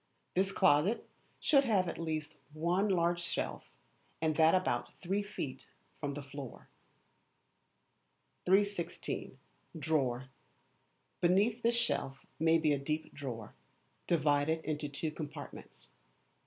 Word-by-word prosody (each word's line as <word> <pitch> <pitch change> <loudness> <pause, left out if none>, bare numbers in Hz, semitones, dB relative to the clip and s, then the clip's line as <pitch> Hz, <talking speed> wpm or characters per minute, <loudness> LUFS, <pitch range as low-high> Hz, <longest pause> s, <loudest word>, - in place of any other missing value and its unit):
This 190 +2 +2
closet 190 +4 +3 0.3
should 280 -2 +5
have 205 -8 +2
at - - -4
least 155 -2 -2 0.2
one 175 +6 +1
large 175 -2 +2
shelf, 170 - -3 0.5
and 155 -1 +1
that 160 +2 +6
about 120 -10 0
three 195 +3 0
feet 155 -10 -6 0.3
from 145 -2 -3
the 145 - -5
floor. 135 -2 -9 1.8
316. 195 -1 0 0.4
Drawer. 135 -5 0 0.9
Beneath 200 +7 +3
this 235 +1 +3
shelf 140 -13 -1
may 160 +1 +5
be 155 -2 +3
a 140 - 0
deep 155 +3 -3
drawer, 125 -6 -6 0.5
divided 155 0 +2
into 150 -2 -2
two 150 +2 -2
compartments. 150 -1 -8
160 Hz, 115 wpm, -33 LUFS, 145-190 Hz, 1.8 s, that